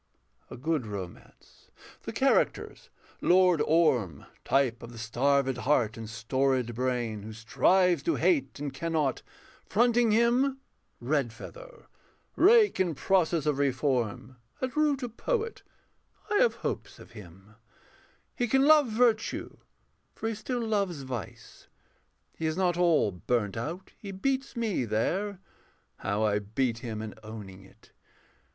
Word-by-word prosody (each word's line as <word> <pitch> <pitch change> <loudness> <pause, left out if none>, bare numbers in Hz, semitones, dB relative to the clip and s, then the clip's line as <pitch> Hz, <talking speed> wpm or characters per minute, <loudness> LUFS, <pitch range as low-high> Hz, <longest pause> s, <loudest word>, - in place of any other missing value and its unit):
A - - -9
good 145 -2 -1
romance: 95 -4 -10 0.4
the - - -4
characters - - 0 0.3
Lord 180 -3 +4
Orm. 125 - +2 0.2
Type 130 -3 +1
of 115 - -9
the 120 - -11
starvéd 135 +3 +1
heart 125 -4 +1
and 115 -1 -7
storéd 125 +2 0
brain, 120 -3 -2
Who 110 +2 -8
strives 175 - +2
to 335 - 0
hate 305 -7 +1
and 145 -1 -4
cannot; 155 -6 -1 0.4
fronting 240 +2 +3
him 240 +5 +3 0.4
Redfeather, 145 - -4 0.5
rake 425 - +5
in 175 -4 +1
process 170 -2 +1
of 150 -2 0
reform, 130 -4 -1 0.2
At 260 +1 -3
root 295 -3 +1
a - - -1
poet: 455 - -3 0.7
I 415 - +3
have 485 +1 +3
hopes - - -5
of - - -15
him: 95 0 -14 0.8
He 245 - 0
can 270 +4 +3
love 300 -2 +6
virtue, 225 0 0 0.6
for 225 - -4
he - - -2
still 235 +2 -3
loves 200 -9 -1
vice. 125 -7 -8 0.7
He 160 - -2
is 155 +1 -2
not 180 -2 +2
all 170 - +3
burnt 105 +3 -1
out. 160 +11 -5
He 200 - -7
beats 265 +8 -2
me 225 - -1
there 180 - -1 0.6
(How 100 +2 -1
I 105 -1 +2
beat 115 +3 -2
him 110 -2 -5
in 110 - -6
owning 105 -3 -10
it!) 95 - -21
145 Hz, 135 wpm, -28 LUFS, -, 0.8 s, love